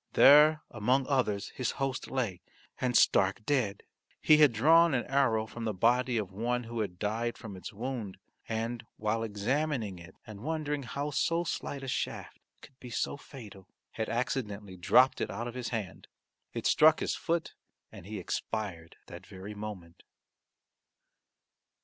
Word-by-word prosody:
There 150 +2 +7
among 125 +5 +1
others 125 -8 0
his 125 -2 -3
host 135 -1 -2
lay, 115 -9 -2 0.4
and 125 -2 +2
stark 100 +2 +3
dead. 120 -9 0 0.4
He 155 - +6
had 150 -3 +6
drawn 160 +7 +5
an 120 - 0
arrow 125 -5 +2
from 115 +1 -7
the 110 -3 -2
body 120 +4 +2
of 100 -4 -3
one 120 +5 -1
who 115 0 -6
had 95 -5 -3
died 115 +4 -2
from 105 -4 -9
its 95 - -8
wound, 115 -3 -5 0.3
and, 115 +1 -3
while 110 +1 -1
examining 115 - -1
it 85 - -13
and 110 -3 -10
wondering 150 0 -2
how 140 +4 -4
so 165 +4 +1
slight 140 -4 -4
a - - -6
shaft - - -4 0.2
could 130 - -16
be 125 - -10
so 115 - -2
fatal, 110 -9 -12 0.2
had 110 - -3
accidentally 105 -5 -3
dropped 125 +9 +4
it - - -1
out 115 +5 -4
of 120 - -6
his 125 -2 -4
hand. 110 -5 -5 0.4
It - - -5
struck 155 0 +6
his - - -1
foot 170 0 -2 0.4
and 90 - -12
he 105 0 -5
expired 95 -3 -4
that - - -11
very 95 +3 -8
moment. 105 -5 -8
115 Hz, 160 wpm, -30 LUFS, 105-135 Hz, 0.4 s, There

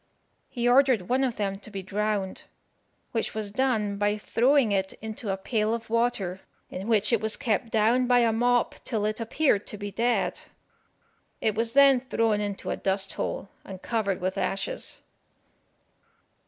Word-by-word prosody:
He 240 -1 -1
ordered 250 -6 +4
one 260 +2 +2
of 250 -3 0
them 195 -2 -2
to 210 - -9
be 195 -2 -6
drowned, 205 0 -2 0.7
which 225 -2 -2
was 215 -2 -3
done 215 -4 0
by 205 +1 +1
throwing 245 +3 +2
it 190 -1 0
into 220 0 -6
a 195 - 0
pail 215 +2 0
of 225 -1 -9
water, 220 -6 0 0.3
in 190 +3 -6
which 220 0 +2
it 230 - +3
was 220 0 +2
kept 230 -3 -1
down 230 +3 +2
by 245 0 +5
a 230 -1 +3
mop 245 +1 +2
till 220 -4 -1
it 215 +1 -1
appeared 230 -2 +1
to 210 - -6
be 205 0 -6
dead. 240 +4 0 1.0
It 220 -2 +1
was 230 +2 -1
then 275 -2 +6
thrown 225 -5 0
into 205 -1 -4
a - - -2
dust 195 0 0
hole, 195 - -4
and 190 -1 -9
covered 200 -3 -1
with 185 +1 -2
ashes. - - -2
220 Hz, 170 wpm, -26 LUFS, 200-240 Hz, 1.0 s, then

